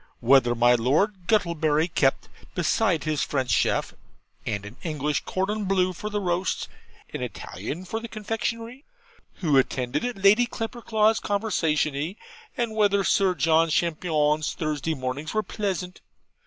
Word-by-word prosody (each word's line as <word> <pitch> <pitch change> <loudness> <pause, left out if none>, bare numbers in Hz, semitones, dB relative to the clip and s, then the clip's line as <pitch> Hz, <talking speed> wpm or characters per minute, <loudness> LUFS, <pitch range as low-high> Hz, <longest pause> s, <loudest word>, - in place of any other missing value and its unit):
'Whether 120 -1 +4
my 120 +1 +5
Lord 170 - +1
Guttlebury 165 -7 +2
kept, 135 -5 +1 0.3
besides 175 -1 +1
his 155 -2 0
French 130 -3 -1
chef, - - +1 0.5
and 100 -1 -2
an 105 +3 -10
English 150 -3 -2
cordonbleu 190 -1 0
for 210 +4 -5
the 210 0 -2
roasts, 180 -1 -1 0.5
an - - -4
Italian 175 +5 -6
for 220 +5 -3
the 230 - -7
confectionery?' 230 +4 -4 0.6
'Who 150 -6 +4
attended 125 - -1
at 245 -2 -3
Lady 205 +5 +5
Clapperclaw's 225 -2 0
conversazioni?' 165 -5 -1 0.4
and 235 -2 -1
'whether 200 -2 +3
Sir 190 -1 +2
John 165 0 +3
Champignon's 155 -2 +1
"Thursday 155 0 -2
Mornings" 135 +6 -4
were 215 - +2
pleasant?' 190 -2 -4
175 Hz, 130 wpm, -25 LUFS, 150-210 Hz, 0.6 s, my